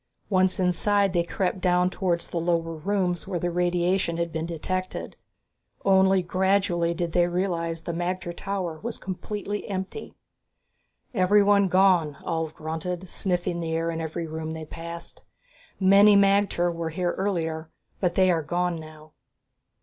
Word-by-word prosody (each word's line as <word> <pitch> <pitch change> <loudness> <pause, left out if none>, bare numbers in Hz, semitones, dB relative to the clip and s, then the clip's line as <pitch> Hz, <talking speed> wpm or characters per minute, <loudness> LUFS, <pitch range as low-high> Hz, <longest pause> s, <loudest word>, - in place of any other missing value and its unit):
Once 185 -1 +3
inside, 195 +2 +2
they 175 - +3
crept 185 +2 -2
down 180 0 +3
towards 180 -2 -1
the 170 - -3
lower 165 -1 0
rooms 180 +1 -1
where 190 -2 -2
the 175 +1 -1
radiation 175 0 +1
had 170 0 -2
been 160 0 -2
detected. 185 +3 -4 0.7
Only 190 -1 +4
gradually 185 -2 +1
did 170 -1 -2
they 175 +1 +3
realize 170 -2 -2
that - - -3
the - - -5
magter 175 -1 -3
tower 185 -5 -3
was 235 +1 -4
completely 205 +2 -5
empty. 190 - -5 1.0
"Everyone 200 0 +4
gone," 185 -5 +3
Ulv 160 -2 -2
grunted, 170 +3 -5
sniffing 180 -2 -1
the 165 -1 -3
air 165 +1 0
in 165 0 -4
every 160 +1 -4
room 160 0 -5
that 160 - -6
they - - -6
passed. 170 +2 -9 0.6
"Many 200 +2 +7
magter 195 -3 +3
were 165 -1 -3
here 175 +2 -1
earlier, 160 -5 -2 0.3
but 180 -3 0
they 185 -1 +4
are 165 -2 +1
gone 175 +2 -1
now." 155 -1 -12
175 Hz, 150 wpm, -26 LUFS, 165-190 Hz, 1.0 s, Many